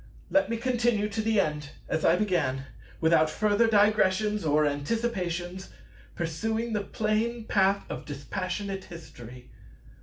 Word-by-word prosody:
Let 295 - +3
me 230 - -1
continue 235 -3 +1
to 215 +2 -2
the 220 -1 +2
end, 150 -4 -1 0.2
as 160 - -1
I 165 - +5
began, 160 -10 0 0.4
without 160 -1 +4
further 210 +6 +2
digressions 210 -1 +3
or 150 0 +3
anticipations, 180 +3 -2 0.5
pursuing 220 +8 -2
the 210 - 0
plain 220 +3 -1
path 195 -1 +2
of - - -6
dispassionate 185 +7 -4
History. 125 -8 -12
195 Hz, 125 wpm, -28 LUFS, 160-220 Hz, 0.5 s, I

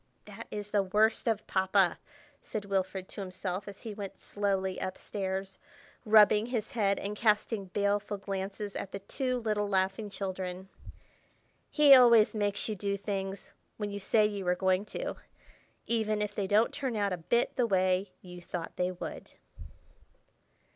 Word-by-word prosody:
"That - - -10
is 210 0 -5
the 205 - +3
worst 215 +5 +2
of 220 -2 0
Papa," 190 -1 +2 0.4
said 210 -2 -5
Wilfrid 190 -1 -2
to - - -6
himself, 185 0 -4
as 200 - -9
he 225 -3 -6
went 200 -2 -7
slowly 195 -2 -2
up 185 - -3
stairs, 190 -1 -4 0.5
rubbing 215 0 +6
his 235 -2 -3
head, 205 -6 +1
and 205 +1 -4
casting 210 -1 +1
baleful 200 +2 -1
glances 195 +1 -5
at 195 - -5
the - - -2
two 255 +6 -2
little 210 -2 0
laughing 195 +2 0
children. 190 -1 -5 1.0
"He 295 -2 +7
always 235 -4 +7
makes 205 -2 0
you 220 - -1
do 200 0 -2
things—when 200 +1 -5
you 200 - -4
say 215 +2 +3
you 200 -3 -3
are 180 - +3
going 190 +2 +1
to—even 215 0 -5
if 210 0 -2
they 200 -1 -2
don't 210 +4 +3
turn 265 -5 -3
out 200 -2 0
a - - -2
bit 235 +8 0
the 245 -2 +2
way 185 -1 +1
you 180 -1 -10
thought 175 -1 -6
they 180 0 0
would." 180 - -8
200 Hz, 155 wpm, -30 LUFS, 190-215 Hz, 1.0 s, He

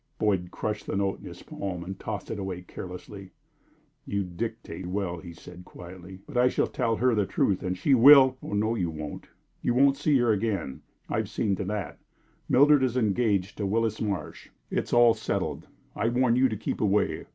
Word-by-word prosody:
Boyd 95 -5 0
crushed 105 +3 -4
the - - -2
note 100 -1 -1
in - - -13
his - - -11
palm 90 -3 -5
and 95 +2 -7
tossed 105 -3 -5
it 105 - -4
away 95 -2 -5
carelessly. 95 +2 -9 0.7
"You 100 0 -2
dictate 90 -1 -6
well," 90 -2 -3
he 85 0 -10
said, 90 +2 -12
quietly, 90 +1 -12
"but 145 - -6
I 125 +1 +5
shall - - +1
tell 115 -3 -1
her 125 +2 +2
the 105 -3 +1
truth, 95 -3 0
and 90 0 -3
she 140 - +2
will 130 +1 +8
" - - -39
"Oh - - -7
no, 110 +2 +1
you 90 -7 -1
won't. 75 -2 -7 0.3
You 120 - 0
won't 140 +1 +4
see 150 0 +2
her 120 -2 +3
again. 100 -10 -2 0.3
I - - -2
have - - -2
seen 100 -2 0
to 100 - -3
that. 105 0 -4 0.5
Mildred 145 +1 +5
is 130 -1 0
engaged 105 -4 0
to 100 - -1
Willis 110 +1 0
Marsh. 100 -7 -4 0.2
It's - - -2
all 120 -1 +6
settled. 110 0 -3 0.3
I 115 - 0
warn 120 0 +2
you 130 +1 +4
to 110 - -4
keep - - -4
away. 105 0 +1
105 Hz, 200 wpm, -27 LUFS, 95-120 Hz, 0.7 s, will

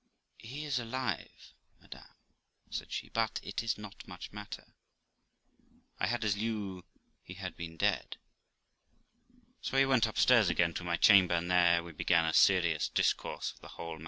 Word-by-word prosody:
'He 135 +7 -7
is 140 -4 -1
alive, 125 +2 -5 0.3
madam' - - -14 0.6
said - - -5
she. - - -4
'But 115 -1 -1
it 100 - -3
is 115 -1 -1
not 105 -2 -11
much 90 -2 -9
matter; 105 0 -9 1.3
I - - +1
had 120 -1 -1
as 105 -2 +2
lieu 100 -4 -4 0.4
he 90 - -11
had 95 -1 -6
been 80 -1 -8
dead.' - - 0 1.4
So 135 - -2
we 135 - +6
went 130 -4 +3
upstairs 110 -2 +4
again 85 0 +2
to 90 - -5
my 85 -1 -1
chamber, 95 -4 +6
and 85 +1 -2
there 85 -1 +4
we 85 - -9
began 85 +2 +2
a 80 - 0
serious 85 -5 +4
discourse - - -1
of - - -22
the - - -12
whole 85 -1 -6
matter. - - -15
100 Hz, 165 wpm, -32 LUFS, 85-115 Hz, 1.4 s, we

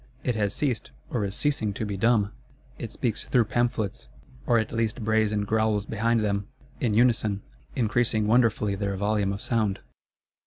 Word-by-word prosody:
It 125 - +1
has 105 -2 0
ceased 125 - -1 0.2
or 120 -4 0
is 95 0 -4
ceasing 125 -9 0
to 110 - -2
be 105 -1 -3
dumb; 105 0 +2 0.5
it - - -5
speaks - - -1
through 120 - +3
Pamphlets, 110 -2 -1 0.4
or 120 - +4
at 110 -1 0
least 115 0 -1
brays 110 -1 +2
and 105 -1 0
growls 110 -1 +1
behind 115 +2 +1
them, 100 -1 -1 0.3
in 110 -5 +1
unison,—increasing 110 - +1
wonderfully 110 -2 +3
their 100 0 -2
volume 100 0 +1
of 100 +1 -4
sound. 110 -5 0
110 Hz, 160 wpm, -26 LUFS, 100-115 Hz, 0.5 s, or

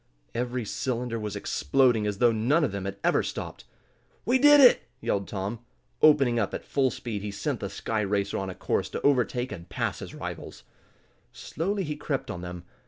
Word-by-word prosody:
Every 120 0 -2
cylinder 120 +1 -2
was 105 -1 -4
exploding 115 - +2
as 105 -1 -2
though 120 +2 +4
none 125 +9 +2
of 140 - +1
them 100 -1 -4
had 100 0 -4
ever - - +3
stopped! - - -6 0.6
"We 250 +5 +3
did 290 +2 +8
it!" 255 -3 +7 0.2
yelled 100 -5 -1
Tom. 100 +3 -4 0.4
Opening 135 -6 +5
up 100 - -1
at - - -7
full 135 -2 +1
speed, 115 -3 -5
he 105 - -4
sent 110 +6 -3
the 100 - -4
sky 110 +2 -2
racer 100 0 -1
on 95 - -3
the 95 - -6
course - - -1
to - - -5
overtake 125 -2 +1
and 85 -4 -8
pass - - -2
his - - -8
rivals. - - -7 0.7
Slowly 195 +5 -3
he 150 -3 -3
crept 135 -3 -3
on 90 - -6
them. 90 0 -7
115 Hz, 190 wpm, -27 LUFS, 100-135 Hz, 0.7 s, did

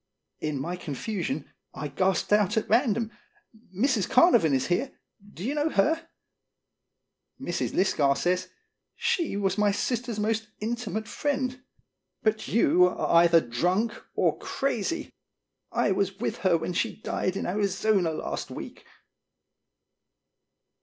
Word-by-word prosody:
In 150 -3 -2
my 175 +6 -3
confusion 155 - -4 0.2
I 150 - -4
gasped 185 +7 +1
out 210 +1 +3
at 220 - 0
random: 230 -3 +2 0.3
" 215 -5 -22
Mrs. 255 -5 +2
Carnavon 245 - +5
is 130 -1 +1
here. 230 +10 -1 0.4
Do 175 - -7
you 260 +7 -1
know 300 +1 +1
her?" 320 +9 +1 1.3
Mrs. - - -2
Lisgar 145 -7 +2
says: 180 +1 0 0.5
"She 330 - 0
was 195 0 0
my 205 -1 +4
sister's 235 +2 -2
most 220 +1 0
intimate 220 -1 -3
friend. 260 +1 -2 0.6
But 220 0 0
you 180 -5 +4
are 180 - 0
either 170 -1 +5
drunk 180 - 0 0.2
or - - +1
crazy. 275 +4 -2 0.6
I 205 - +1
was 195 0 0
with 225 - -2
her 185 -4 +3
when 165 +2 -3
she 225 +6 -1
died 185 -3 -2
in - - -3
Arizona 200 -1 +1
last 160 - -4
week." - - -8
205 Hz, 130 wpm, -27 LUFS, 180-235 Hz, 1.3 s, Carnavon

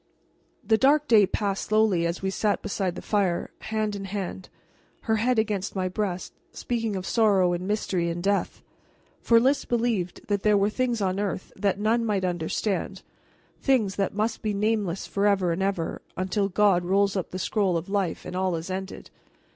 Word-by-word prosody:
The 220 -1 +2
dark 295 +2 +4
day 215 -6 +6
passed 200 -1 -2
slowly 210 -6 +2
as 170 +3 -4
we 190 - 0
sat 205 +1 0
beside 190 -3 -2
the - - -8
fire, 195 -5 0
hand 215 -1 -2
in 195 -1 -5
hand, 190 -1 -5 0.5
her 220 -1 +1
head 245 +3 +1
against 205 -3 -1
my 185 -1 0
breast, 185 -2 -3 0.2
speaking 225 -4 -2
of 185 -1 -4
sorrow 195 -6 +3
and 180 +2 -3
mystery 190 -4 0
and 170 +1 -4
death. 200 0 0 0.6
For 230 -1 +5
Lys 270 +3 +2
believed 230 -7 -1
that 205 -1 0
there 210 0 +4
were 200 +1 +2
things 245 -2 -1
on 190 0 0
earth 200 -2 -3
that 200 -1 0
none 225 +3 +2
might 205 -4 0
understand, 185 +2 -2 0.6
things 225 -9 +2
that 195 -1 -1
must 220 +2 -1
be 210 -2 -1
nameless 205 -3 0
forever 200 -3 +1
and 170 +3 -2
ever, 190 -4 -2 0.2
until 190 +2 0
God 195 -2 +3
rolls 195 +2 +2
up 190 - -2
the 185 - -5
scroll 190 -1 +1
of 165 - -5
life 195 -4 -1
and - - -6
all 185 -1 0
is 165 +3 -5
ended. 190 +1 -6
200 Hz, 180 wpm, -26 LUFS, 185-215 Hz, 0.6 s, day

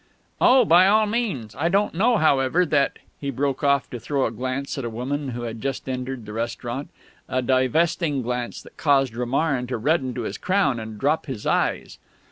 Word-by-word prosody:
"Oh, 255 -1 +6
by 180 +1 +6
all 215 +2 +4
means. 205 - -2
I 160 +4 0
don't 200 +3 +1
know, 225 +7 +3
however, 155 +1 +3
that 145 -3 +1
" - - -36
he 140 - -2
broke 140 +1 -2
off 140 -1 +3
to 120 - -5
throw 140 +2 -1
a - - -1
glance 130 +4 -3
at - - -4
a 120 - -3
woman 135 +5 -3
who 120 -1 -5
had 115 -1 -5
just 135 -1 -3
entered 130 -2 -4
the 105 - -8
restaurant 120 +4 -4 0.4
a 130 0 0
divesting 135 +3 +1
glance 125 0 -4
that - - -17
caused 135 -5 +2
Romarin 125 +2 0
to 125 - -2
redden 130 0 0
to 125 - -3
his 110 - -5
crown 185 -11 +1
and 110 -1 -7
drop 150 +4 0
his 130 -7 -6
eyes. - - 0
135 Hz, 200 wpm, -23 LUFS, 125-160 Hz, 0.4 s, Oh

